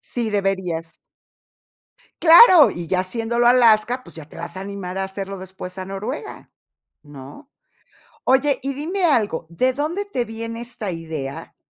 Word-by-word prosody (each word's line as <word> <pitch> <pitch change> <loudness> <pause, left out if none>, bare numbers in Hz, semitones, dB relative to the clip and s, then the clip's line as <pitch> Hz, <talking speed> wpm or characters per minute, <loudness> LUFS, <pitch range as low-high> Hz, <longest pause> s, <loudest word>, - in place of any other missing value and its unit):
Sí, 235 -3 -4
deberías. 190 -5 -2 1.2
Claro, 340 -1 +8
y 170 -1 -7
ya 185 -1 +1
haciéndolo 230 +5 -1
a 240 - +7
Alaska, 240 0 +3
pues, - - -14
ya 160 -2 -9
te - - -15
vas 170 +2 -7
a - - -5
animar 195 -2 -6
a 195 - -1
hacerlo 195 0 -6
después 185 0 -9
a 185 - -5
Noruega, 215 - -7 0.5
¿no? 145 - -13 0.7
Oye, 265 +1 +2
y 275 +1 -3
dime 350 +7 -3
algo, 210 - +1
¿de 255 +10 0
dónde 325 +9 -3
te 255 -12 -3
viene 230 +1 -7
esta 235 -4 -5
idea 160 -5 -7
215 Hz, 155 wpm, -21 LUFS, 185-255 Hz, 1.2 s, Claro